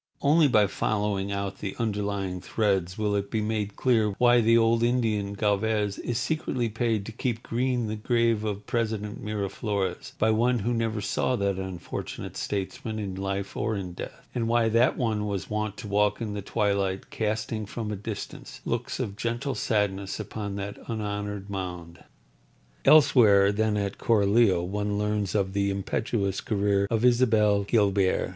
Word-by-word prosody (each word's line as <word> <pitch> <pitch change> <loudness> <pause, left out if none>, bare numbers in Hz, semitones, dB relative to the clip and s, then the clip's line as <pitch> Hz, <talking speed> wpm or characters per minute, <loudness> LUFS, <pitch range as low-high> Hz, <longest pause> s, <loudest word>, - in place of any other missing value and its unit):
Only 150 +2 +5
by 110 -5 +4
following 100 0 -1
out 100 -1 -3
the 100 -2 -4
underlying 100 -4 -2
threads 95 -5 0
will 105 -1 0
it 100 0 -1
be 110 - -1
made 105 -1 -2
clear 110 -5 +2
why 120 -1 +5
the 115 +1 +5
old 115 0 +3
Indian, 110 -4 +1
Galvez, 105 0 0
is 120 - -2
secretly 130 -4 -1
paid 110 -2 -1
to 115 - -6
keep 120 +1 -3
green 125 0 0
the 110 0 -3
grave 115 -1 +1
of 105 -1 -3
President 110 0 -2
Miraflores 100 -2 -3
by 110 +1 +3
one 120 +3 +2
who 120 - +1
never 115 -2 -1
saw 100 +5 0
that 100 -3 0
unfortunate 95 -2 -6
statesman 105 +2 -3
in 100 -3 -3
life 95 +1 -3
or 110 -2 -1
in 95 -3 -5
death, - - -9
and 115 -2 -1
why 115 -1 +3
that 115 +3 +3
one 110 -4 0
was 100 -1 -4
wont 105 -1 -2
to - - -7
walk 105 0 +2
in 110 -3 -3
the 105 - -4
twilight, 100 -2 -1
casting 110 0 -2
from 110 0 -4
a - - -2
distance 105 +1 -7
looks - - -2
of 100 - -3
gentle 120 +6 -2
sadness 100 -3 -1
upon 105 -1 -5
that 100 0 -5
unhonoured 105 -2 -3
mound. 90 -4 -6 0.8
Elsewhere 105 -10 +6
than 110 0 +1
at 100 -1 -2
Coralio 100 -4 +3
one 105 +2 -2
learns 105 -1 -1
of 95 -2 0
the 100 0 +1
impetuous 100 +1 -1
career 100 -1 +1
of 115 +1 +1
Isabel 110 -4 +4
Guilbert. 100 -3 +2
105 Hz, 165 wpm, -27 LUFS, 100-115 Hz, 0.8 s, Elsewhere